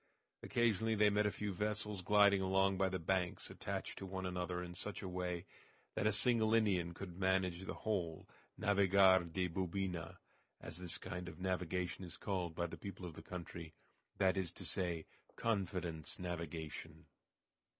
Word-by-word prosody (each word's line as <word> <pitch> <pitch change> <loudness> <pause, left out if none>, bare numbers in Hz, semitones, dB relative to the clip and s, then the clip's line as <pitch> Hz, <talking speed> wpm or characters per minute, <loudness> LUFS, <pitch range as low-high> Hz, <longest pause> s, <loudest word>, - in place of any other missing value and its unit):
Occasionally 115 -1 +2
they 105 0 +5
met 105 +1 +3
a - - +1
few 105 -1 -3
vessels 105 0 -1
gliding 100 0 +6
along 95 +1 +3
by 95 0 +2
the 95 - -1
banks 90 +1 0
attached - - -4
one 95 0 -4
to 90 - -1
another 90 0 -2
in 90 0 -6
such 105 +3 -5
a - - -3
way 90 -1 -2 0.5
that 105 - +1
a - - +5
single 110 +1 +4
Indian 90 -6 +2
could 90 -2 -7
manage 95 -2 +2
the - - -4
whole 90 -7 -2 0.3
"navigar 95 -3 +5
de 90 +2 +1
bubina," 90 -1 -2 0.4
as 85 - -7
this 90 -1 -1
kind 90 0 -5
of 80 - -11
navigation 90 0 -1
is 90 0 -8
called 90 -5 -2
by 85 - 0
the 85 - -5
people 95 -2 -6
of 85 - -6
the 80 - -9
country, 85 -2 -7 0.4
that 95 -1 +3
is 90 -3 0
to - - -6
say, 85 -4 0 0.3
"confidence 90 -7 -1
navigation." 85 -3 -5
95 Hz, 165 wpm, -38 LUFS, 90-100 Hz, 0.5 s, gliding